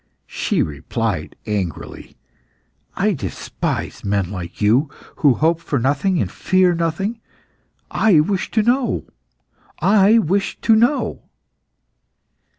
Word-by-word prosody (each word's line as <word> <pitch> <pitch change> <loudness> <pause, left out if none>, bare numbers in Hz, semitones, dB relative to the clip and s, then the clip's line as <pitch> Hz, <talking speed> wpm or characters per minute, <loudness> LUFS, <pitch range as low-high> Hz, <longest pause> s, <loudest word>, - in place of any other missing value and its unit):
She - - -1
replied 80 +4 -3
angrily 100 -6 -5 0.8
"I 200 +3 +1
despise 100 - -4
men 100 -2 -1
like 90 -3 -7
you, 120 +8 +3 0.3
who 140 -5 +4
hope 165 +4 +2
for 150 -4 -2
nothing 145 +9 +1
and - - -1
fear 185 -1 +2
nothing. 170 +7 -2 0.7
I 210 -8 +4
wish 190 +5 0
to 220 - +1
know! 245 +3 +1 0.7
I 205 +2 +5
wish 195 -1 0
to 225 - +4
know!" 240 +6 +1
165 Hz, 110 wpm, -20 LUFS, -, 0.8 s, I